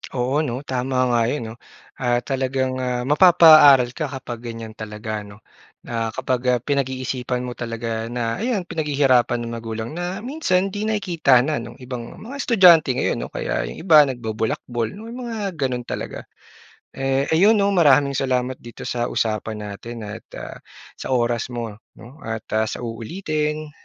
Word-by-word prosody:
Oo 130 Hz, +3 st, +1 dB
'no. 130 Hz, -3 st, -3 dB
Tama 130 Hz, -1 st, -2 dB, 0.2 s
nga 120 Hz, -1 st, +3 dB
'yon 120 Hz, -4 st, -3 dB
'no. -, -, -10 dB, 0.4 s
Ah, 120 Hz, -1 st, +1 dB
talagang, 130 Hz, -1 st, -1 dB
ah, 125 Hz, -1 st, -1 dB
mapapa-aral 150 Hz, -4 st, +7 dB
ka 155 Hz, +4 st, -3 dB
kapag 130 Hz, -4 st, -7 dB
ganyan 115 Hz, -1 st, -7 dB
talaga 110 Hz, 0 st, -6 dB
ano, 105 Hz, +1 st, -14 dB, 0.4 s
na 115 Hz, -1 st, -2 dB
kapag, 130 Hz, -1 st, -1 dB, 0.2 s
ah, -, -, -1 dB
pinag-iisipan 130 Hz, -2 st, -2 dB
mo 125 Hz, -, -4 dB
talaga 115 Hz, -1 st, -4 dB
na 115 Hz, +1 st, -2 dB
ayan 225 Hz, -4 st, -1 dB
pinaghihirapan 140 Hz, -7 st, +2 dB
ng 115 Hz, -, -5 dB
magulang 115 Hz, 0 st, -5 dB
na 175 Hz, +4 st, -4 dB
minsan 195 Hz, -9 st, 0 dB
'di 205 Hz, +2 st, -3 dB
nakikita 175 Hz, -, +3 dB
na 150 Hz, +2 st, -1 dB
nung 120 Hz, 0 st, -9 dB
ibang 125 Hz, -2 st, -7 dB
mga 245 Hz, +6 st, -9 dB
estudyante 180 Hz, -, +6 dB
ngayon -, -, 0 dB
'no -, -, -4 dB
kaya -, -, -2 dB
yung -, -, -9 dB
iba 155 Hz, -5 st, +8 dB
nagbolakbol 115 Hz, -1 st, -3 dB
'no 220 Hz, +3 st, -10 dB
mga 230 Hz, -5 st, -4 dB
gano'n 125 Hz, -3 st, -1 dB
talaga. -, -, -5 dB, 0.7 s
Eh, 135 Hz, +1 st, 0 dB
ayun 200 Hz, +7 st, +6 dB
'no 200 Hz, 0 st, +3 dB
maraming 145 Hz, -5 st, +4 dB
salamat 130 Hz, -1 st, 0 dB
dito 120 Hz, 0 st, -10 dB
sa 120 Hz, -1 st, -1 dB
usapan 110 Hz, -1 st, -2 dB
natin 110 Hz, +2 st, -7 dB
at 105 Hz, +2 st, -8 dB
ah, -, -, -8 dB, 0.4 s
sa -, -, -7 dB
oras 120 Hz, -1 st, 0 dB
mo 115 Hz, -3 st, -5 dB, 0.2 s
'no, 125 Hz, +6 st, -13 dB
at 110 Hz, -1 st, -5 dB
ah, 110 Hz, 0 st, +2 dB
sa -, -, -5 dB
uulitin. 150 Hz, -, -3 dB
130 Hz, 160 wpm, -22 LUFS, 115-155 Hz, 0.7 s, iba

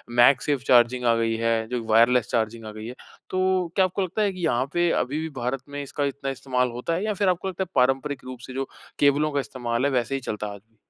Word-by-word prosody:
MagSafe 130 Hz, +3 st, +4 dB
charging 125 Hz, 0 st, +4 dB
आ 115 Hz, -1 st, +4 dB
गई 115 Hz, 0 st, 0 dB
है। 115 Hz, -1 st, 0 dB
जो 125 Hz, -2 st, -2 dB
वायरलेस 115 Hz, +1 st, +5 dB
चार्जिंग 115 Hz, -1 st, -1 dB
आ 110 Hz, -, -6 dB
गई 110 Hz, 0 st, -8 dB
है। 125 Hz, -, -7 dB, 0.3 s
तो 185 Hz, -1 st, +1 dB
क्या 190 Hz, -, +5 dB
आपको 185 Hz, +2 st, -2 dB
लगता 190 Hz, +3 st, -1 dB
है 205 Hz, -2 st, +2 dB
कि 180 Hz, -2 st, -3 dB
यहाँ 125 Hz, -1 st, +1 dB
पे 175 Hz, 0 st, +2 dB
अभी 140 Hz, +5 st, -4 dB
भी 160 Hz, -, -4 dB
भारत 125 Hz, +2 st, -2 dB
में 145 Hz, 0 st, -5 dB
इसका 140 Hz, +1 st, -3 dB
इतना 140 Hz, 0 st, -3 dB
इस्तेमाल 125 Hz, -1 st, -1 dB
होता 125 Hz, +8 st, -3 dB
है 180 Hz, -, -2 dB
या 215 Hz, -, 0 dB
फिर 200 Hz, -1 st, +1 dB
आपको 180 Hz, +1 st, -1 dB
लगता 190 Hz, 0 st, -2 dB
है -, -, -8 dB
पारंपरिक 135 Hz, +2 st, +1 dB
रूप 130 Hz, -1 st, -8 dB
से 130 Hz, -, -8 dB
जो 135 Hz, +1 st, -3 dB, 0.3 s
केबलों 145 Hz, +2 st, +3 dB
का 145 Hz, -, 0 dB
इस्तेमाल 120 Hz, -2 st, -2 dB
है 140 Hz, -, +2 dB
वैसे 125 Hz, +1 st, 0 dB
ही 135 Hz, -, -3 dB
चलता 105 Hz, -3 st, -4 dB
है 100 Hz, -, -6 dB
आज 100 Hz, -, -12 dB
भी? 110 Hz, -, -35 dB
130 Hz, 260 wpm, -25 LUFS, 120-155 Hz, 0.3 s, वायरलेस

